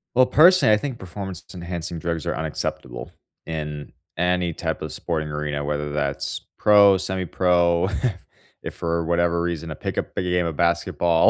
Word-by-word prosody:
Well, 130 Hz, +1 st, +6 dB
personally, 155 Hz, -1 st, +6 dB
I -, -, +5 dB
think 130 Hz, +2 st, -4 dB
performance-enhancing 90 Hz, -3 st, -6 dB
drugs 85 Hz, -1 st, -3 dB
are -, -, -1 dB
unacceptable, 75 Hz, -5 st, -4 dB, 0.3 s
in 75 Hz, -3 st, -5 dB, 0.2 s
any 90 Hz, 0 st, +1 dB
type -, -, -3 dB
of -, -, -5 dB
sporting 80 Hz, -3 st, -3 dB
arena, 75 Hz, -1 st, -3 dB
whether 75 Hz, 0 st, -2 dB
that's 70 Hz, -1 st, -2 dB, 0.2 s
pro, 100 Hz, -2 st, +6 dB
semi-pro, 90 Hz, -2 st, +1 dB
if 95 Hz, 0 st, -2 dB, 0.4 s
if -, -, -5 dB
for 85 Hz, 0 st, -1 dB
whatever 85 Hz, 0 st, +1 dB
reason 85 Hz, -2 st, -3 dB
a -, -, -4 dB
pick-up -, -, -4 dB
game 90 Hz, -1 st, 0 dB
of 80 Hz, -3 st, -3 dB
basketball, 85 Hz, 0 st, +3 dB
85 Hz, 150 wpm, -23 LUFS, 80-95 Hz, 0.4 s, Well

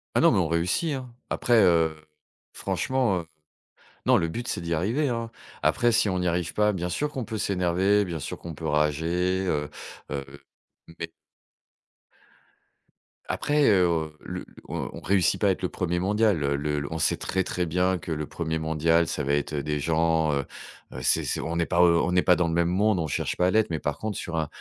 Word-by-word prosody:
Ah -, -, +4 dB
non, -, -, +6 dB
mais -, -, +3 dB
on 85 Hz, -, +1 dB
réussit, 85 Hz, -, 0 dB
hein. 125 Hz, -3 st, -6 dB, 0.2 s
Après, 120 Hz, -3 st, +3 dB
heu, 80 Hz, -3 st, +3 dB, 0.6 s
franchement, 125 Hz, -8 st, 0 dB
heu, 80 Hz, -, -8 dB, 0.8 s
non, -, -, +6 dB
le 85 Hz, -, +1 dB
but, 120 Hz, +9 st, -5 dB
c'est -, -, -2 dB
d'y 85 Hz, 0 st, -3 dB
arriver, 115 Hz, -, 0 dB
hein. 115 Hz, -1 st, -3 dB, 0.3 s
Après, 120 Hz, -1 st, +3 dB
si 110 Hz, -2 st, +3 dB
on 95 Hz, -1 st, 0 dB
n'y 90 Hz, 0 st, 0 dB
arrive 85 Hz, 0 st, -1 dB
pas, 105 Hz, 0 st, +3 dB
bien 90 Hz, -2 st, -3 dB
sûr 150 Hz, +10 st, -1 dB
qu'on 130 Hz, -5 st, -4 dB
peut 110 Hz, +1 st, -5 dB
s'énerver, 95 Hz, +2 st, +2 dB
bien 85 Hz, -3 st, -4 dB
sûr -, -, -5 dB
qu'on 85 Hz, -2 st, -8 dB
peut 80 Hz, -, -6 dB
rager, 80 Hz, +5 st, +1 dB
heu, 75 Hz, -3 st, -1 dB, 0.4 s
heu. 70 Hz, -2 st, -3 dB, 0.7 s
Mais 85 Hz, 0 st, -5 dB, 2.2 s
après, 145 Hz, -1 st, +1 dB
heu, 85 Hz, -5 st, +2 dB
le -, -, -6 dB, 0.2 s
on -, -, -3 dB
on -, -, -8 dB
réussit 95 Hz, -2 st, +2 dB
pas 100 Hz, -, +4 dB
à -, -, +5 dB
être 95 Hz, -, -3 dB
le 90 Hz, -, 0 dB
1er 85 Hz, -1 st, -1 dB
mondial, 105 Hz, -2 st, +2 dB
heu, 70 Hz, 0 st, +1 dB
le 75 Hz, +1 st, -1 dB
l 70 Hz, -, -2 dB
on 80 Hz, -, -2 dB
sait -, -, +2 dB
très, 95 Hz, 0 st, -1 dB
très 90 Hz, 0 st, -2 dB
bien 90 Hz, +3 st, +1 dB
que 85 Hz, -, -7 dB
le 75 Hz, -1 st, -2 dB
1er 80 Hz, 0 st, -3 dB
mondial, 80 Hz, +1 st, +2 dB
ça 75 Hz, -, -2 dB
va 70 Hz, +1 st, 0 dB
être, 75 Hz, +1 st, -1 dB
heu, 70 Hz, -2 st, -2 dB
des 75 Hz, -1 st, -1 dB
gens, 80 Hz, 0 st, +2 dB
heu, 70 Hz, -1 st, -1 dB, 0.5 s
heu, 65 Hz, -, -6 dB
c'est -, -, +2 dB
c'est -, -, -1 dB
on 85 Hz, +1 st, -3 dB
n'est 85 Hz, -, +2 dB
pas 90 Hz, 0 st, +2 dB
au 85 Hz, -1 st, +5 dB
on -, -, 0 dB
n'est 90 Hz, -, +4 dB
pas 90 Hz, -2 st, +4 dB
dans 85 Hz, -1 st, +1 dB
le 80 Hz, -, -1 dB
même 85 Hz, 0 st, +2 dB
monde, 100 Hz, +1 st, +2 dB
on 80 Hz, -, -1 dB
cherche 70 Hz, -, -2 dB
pas 90 Hz, -, +2 dB
à -, -, +2 dB
l'être, 110 Hz, -3 st, +2 dB
mais 80 Hz, -, -2 dB
par 75 Hz, -1 st, -2 dB
contre 105 Hz, -3 st, -4 dB
sur 80 Hz, -2 st, -4 dB
un 80 Hz, -2 st, 0 dB
85 Hz, 220 wpm, -26 LUFS, 80-100 Hz, 2.2 s, non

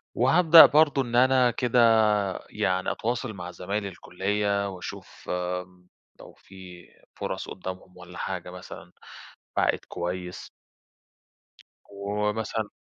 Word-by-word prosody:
وهابدأ 160 Hz, +6 st, +8 dB
برضه 145 Hz, -2 st, +3 dB
إن 120 Hz, -2 st, -4 dB
أنا 130 Hz, 0 st, +4 dB
كده 125 Hz, +1 st, 0 dB, 0.7 s
يعني 95 Hz, +2 st, -1 dB
أتواصل 120 Hz, 0 st, -3 dB
مع 90 Hz, -2 st, -8 dB
زمايل 100 Hz, +4 st, -4 dB
الكليّة، 100 Hz, +2 st, -2 dB
وأشوف 90 Hz, -2 st, -10 dB
آمم، 90 Hz, 0 st, -4 dB, 0.3 s
لو -, -, -13 dB
في 90 Hz, -2 st, -14 dB, 0.3 s
فُرَص -, -, -5 dB
قُدّامهم 90 Hz, 0 st, -8 dB
والَّا 90 Hz, 0 st, -12 dB
حاجة 90 Hz, -2 st, -5 dB
مثلًا 90 Hz, -1 st, -11 dB, 0.7 s
بعائد -, -, +2 dB
كويّس. 90 Hz, +1 st, -5 dB, 1.4 s
ومثلًا 105 Hz, +2 st, -3 dB
100 Hz, 105 wpm, -26 LUFS, 90-115 Hz, 1.4 s, وهابدأ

